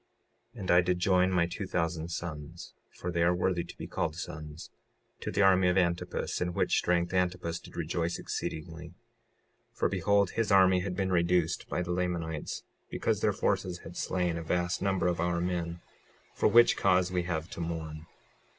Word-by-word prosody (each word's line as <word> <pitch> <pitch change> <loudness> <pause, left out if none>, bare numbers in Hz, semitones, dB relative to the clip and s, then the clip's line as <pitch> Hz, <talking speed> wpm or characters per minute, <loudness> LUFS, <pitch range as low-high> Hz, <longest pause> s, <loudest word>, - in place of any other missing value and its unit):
56:10 - - -11
And 95 - 0
I 90 +1 +7
did 90 0 0
join 90 0 +3
my 90 -2 +3
two 85 - -5
thousand 85 0 -1
sons, 85 -1 -6 0.2
(for 90 - -5
they 85 -1 0
are 85 +1 +4
worthy 90 -1 0
to - - -12
be - - -6
called 80 - -2
sons) 75 -2 -7 0.5
to - - -4
the 100 - +2
army 95 -1 +5
of 90 +1 +2
Antipus, 85 -2 0
in 90 -1 -1
which - - +2
strength 85 0 +1
Antipus 90 -2 0
did - - -14
rejoice 85 +1 -1
exceedingly; 80 +1 -5 0.8
for - - 0
behold, 100 +1 +2
his 115 -2 -1
army 95 -1 +6
had 90 0 -3
been 95 0 -1
reduced 85 -1 +1
by 90 - -1
the 90 - -4
Lamanites 85 -3 -2 0.3
because - - -1
their - - +3
forces 90 -1 -1
had 85 - -10
slain 90 -2 -1
a - - -6
vast 85 +2 -1
number 95 -3 +1
of 90 -1 +1
our 85 0 0
men, 85 -1 -2 0.5
for - - +2
which 120 0 +6
cause 90 -1 +2
we 90 -1 +1
have 85 -2 -3
to - - -6
mourn. 80 -1 -5
90 Hz, 185 wpm, -30 LUFS, 85-90 Hz, 0.8 s, I